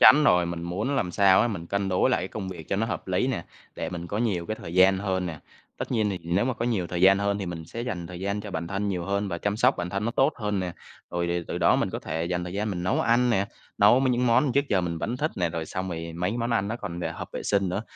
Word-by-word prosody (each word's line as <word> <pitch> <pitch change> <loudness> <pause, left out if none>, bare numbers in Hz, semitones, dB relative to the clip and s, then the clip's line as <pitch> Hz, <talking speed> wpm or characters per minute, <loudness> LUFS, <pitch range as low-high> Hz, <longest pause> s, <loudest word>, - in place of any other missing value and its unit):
chắn 150 +2 +8
rồi 90 -8 +4
mình 85 0 -4
muốn 105 +11 -2
làm 90 -8 0
sao 95 0 +5
á, 120 - +3
mình 85 -6 -5
cân 100 +1 -1
đối 95 +7 +3
lại 125 - +2
cái 90 - -4
công 95 -3 -5
việc 85 -4 -8
cho 95 - 0
nó 110 +3 +1
hợp 110 - -4
lý 95 +6 +1
nè, 130 -10 -2 0.3
để - - -3
mình 85 -1 -5
có 105 +4 -3
nhiều 95 -8 0
cái 110 - -2
thời 85 - -7
gian 95 +1 +6
hơn 95 -2 -1
nè. 80 -3 -5 0.4
Tất - - -4
nhiên 110 -3 +2
thì 95 - -3
nếu 90 +6 +1
mà 130 -1 0
có 115 - -3
nhiều 100 -7 0
thời 90 0 -3
gian 95 +1 +7
hơn 100 0 0
thì 95 - -4
mình 85 -2 -5
sẽ 115 +8 -6
dành 90 -9 -4
thời 90 0 -8
gian 100 +2 -1
cho 105 0 -7
bản 85 -2 -3
thân 100 +2 -2
nhiều 90 -3 -2
hơn 100 +1 -1
và 85 -2 -3
chăm 100 +3 -1
sóc 125 +4 +4
bản 90 0 -3
thân 100 +3 -2
nó 115 - 0
tốt 135 +5 +3
hơn 105 -3 -1
nè. 90 -2 -3 0.4
Rồi 85 0 -1
thì 85 0 -1
từ - - -2
đó - - +4
mình - - 0
có - - -3
thể 80 +1 -3
dành 90 0 -2
thời 90 - -6
gian 105 +2 -1
mình 90 -3 -3
nấu 90 - +1
ăn 120 +1 +3
nè, 100 -3 +2 0.3
nấu 105 +5 +6
m 135 - +1
những 125 0 +1
món 125 +3 +4
trước 140 +2 +3
giờ 95 - +3
mình 85 -2 -3
vẫn 120 +8 -2
thích 155 +4 0
nè, 90 -2 +1
rồi 80 -1 -4
xong 95 0 -4
rồi 85 -1 -5
mấy 90 +4 0
cái 115 - -3
món 120 +1 -1
ăn 105 -3 +1
nó 115 - -2
còn, 85 -7 -6
ờ, - - -2
hợp - - -7
vệ - - -4
sinh 100 -2 +1
nữa, 95 +4 -2
95 Hz, 320 wpm, -26 LUFS, 90-110 Hz, 0.4 s, chắn